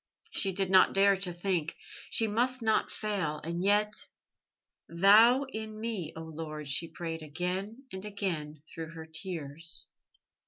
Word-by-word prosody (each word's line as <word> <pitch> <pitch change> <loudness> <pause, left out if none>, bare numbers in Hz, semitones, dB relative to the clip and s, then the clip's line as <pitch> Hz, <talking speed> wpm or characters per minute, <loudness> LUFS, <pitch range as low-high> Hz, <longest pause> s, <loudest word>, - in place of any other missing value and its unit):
She 195 - +1
did 190 0 0
not 190 0 +6
dare 200 0 +6
to 190 -1 -3
think. 175 -2 -1 0.3
She 225 - +3
must 240 +3 0
not 220 -1 +2
fail 190 -8 -2
and 170 +2 -3
yet.... 210 +1 +2 0.8
"Thou 215 +9 +6
in 220 -5 -6
me, 215 -8 -3
O 160 - -6
Lord," 155 -2 -6
she 145 +5 -1
prayed 165 -1 -5
again 180 - -4
and 190 0 -5
again 170 -8 -3
through 165 0 -6
her 160 -1 -7
tears. 160 -2 -5
185 Hz, 145 wpm, -30 LUFS, 160-210 Hz, 0.8 s, not